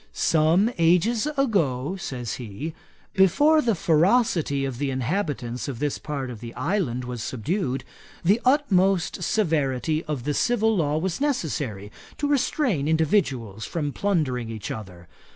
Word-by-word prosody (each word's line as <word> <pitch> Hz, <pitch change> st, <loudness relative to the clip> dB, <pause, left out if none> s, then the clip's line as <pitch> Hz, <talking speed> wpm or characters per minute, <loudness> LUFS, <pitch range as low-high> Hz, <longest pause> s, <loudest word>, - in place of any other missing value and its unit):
"Some 165 Hz, +8 st, +3 dB
ages 180 Hz, -, +3 dB
ago, 175 Hz, -, +1 dB
(says 125 Hz, -, -5 dB
he,) 125 Hz, +7 st, -6 dB, 0.4 s
before 290 Hz, -, +4 dB
the 230 Hz, -5 st, +1 dB
ferocity 165 Hz, -, +2 dB
of 130 Hz, -3 st, -5 dB
the 145 Hz, -, -1 dB
inhabitants 130 Hz, -, -2 dB
of 135 Hz, -4 st, -4 dB
this 145 Hz, +3 st, -2 dB
part 140 Hz, -4 st, -4 dB
of 115 Hz, -, -8 dB
the 115 Hz, 0 st, -9 dB
island 145 Hz, -, -1 dB
was 125 Hz, -2 st, -5 dB
subdued, 135 Hz, -, -2 dB, 0.4 s
the 205 Hz, +7 st, +4 dB
utmost 195 Hz, -, +2 dB
severity 155 Hz, -, 0 dB
of 145 Hz, -5 st, -3 dB
the 145 Hz, +2 st, -1 dB
civil 225 Hz, +3 st, +2 dB
law 150 Hz, -4 st, +1 dB
was 180 Hz, -, -2 dB
necessary, 140 Hz, -, -2 dB, 0.3 s
to 290 Hz, -, -1 dB
restrain 255 Hz, -, +1 dB
individuals 145 Hz, -, 0 dB
from 145 Hz, -1 st, -3 dB
plundering 145 Hz, -, 0 dB
each 110 Hz, -1 st, -5 dB
other. 90 Hz, -5 st, -8 dB
155 Hz, 135 wpm, -25 LUFS, 125-195 Hz, 0.4 s, before